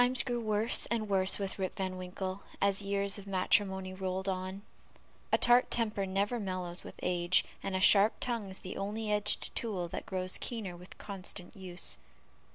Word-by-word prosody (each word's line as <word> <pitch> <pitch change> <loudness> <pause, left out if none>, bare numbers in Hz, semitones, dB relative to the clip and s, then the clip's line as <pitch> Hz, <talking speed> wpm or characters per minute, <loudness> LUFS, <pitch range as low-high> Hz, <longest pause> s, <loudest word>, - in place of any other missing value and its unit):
Times 245 -1 +3
grew 245 -2 -2
worse 215 0 +3
and 225 -2 -2
worse 190 -1 +8
with 195 -1 -5
Rip 190 -1 -3
Van 190 -1 -3
Winkle 185 +1 -5 0.2
as 200 0 +1
years 200 0 -1
of 200 - -12
matrimony 190 0 0
rolled 190 0 -4
on; 190 +1 -4 0.7
a - - +4
tart 245 +1 +4
temper 215 -4 +2
never 200 +5 -1
mellows 185 -3 -3
with - - -10
age, 175 0 +1 0.2
and 195 - -3
a - - 0
sharp 200 +3 +6
tongue 230 -5 -2
is 190 - -8
the 185 - -7
only 210 +2 -3
edged 210 0 0
tool 195 -7 -2
that - - -6
grows 185 -1 -1
keener 215 -7 -5
with 180 +1 -13
constant 195 -1 -6
use. 185 -2 -3
195 Hz, 175 wpm, -31 LUFS, 185-210 Hz, 0.7 s, worse